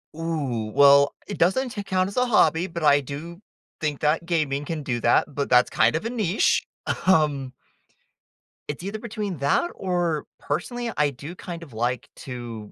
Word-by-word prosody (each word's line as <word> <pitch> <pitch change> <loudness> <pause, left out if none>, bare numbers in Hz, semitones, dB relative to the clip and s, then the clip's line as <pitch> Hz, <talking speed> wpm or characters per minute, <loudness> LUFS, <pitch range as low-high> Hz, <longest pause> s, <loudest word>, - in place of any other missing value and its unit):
Ooh, 140 -10 -2
well, 140 0 +6
it 205 - -6
doesn't 220 +10 +2
t 210 -3 -5
count 185 -1 0
as 200 - -8
a 250 - +4
hobby, 170 -6 +3
but 170 -2 -6
I 145 -1 +6
do 160 +7 -8 0.4
think 150 -2 -2
that 155 +3 +1
gaming 150 -5 0
can 155 0 -4
do 120 -4 -2
that, 120 - +4
but 140 0 -2
that's 125 0 +5
kind - - +3
of 165 - -2
a 230 - -1
niche, 210 -5 +2 0.4
um 145 -7 +2 1.2
it's 150 +3 -5
either 200 +3 -4
between 210 -5 -4
that 140 - +1
or 175 -5 -1
personally 240 -1 -3
I 150 -1 +3
do 145 +6 -9
kind 170 -2 -7
of 145 -7 -13
like 120 +2 -2
to 120 -5 -7
160 Hz, 175 wpm, -24 LUFS, 140-185 Hz, 1.2 s, well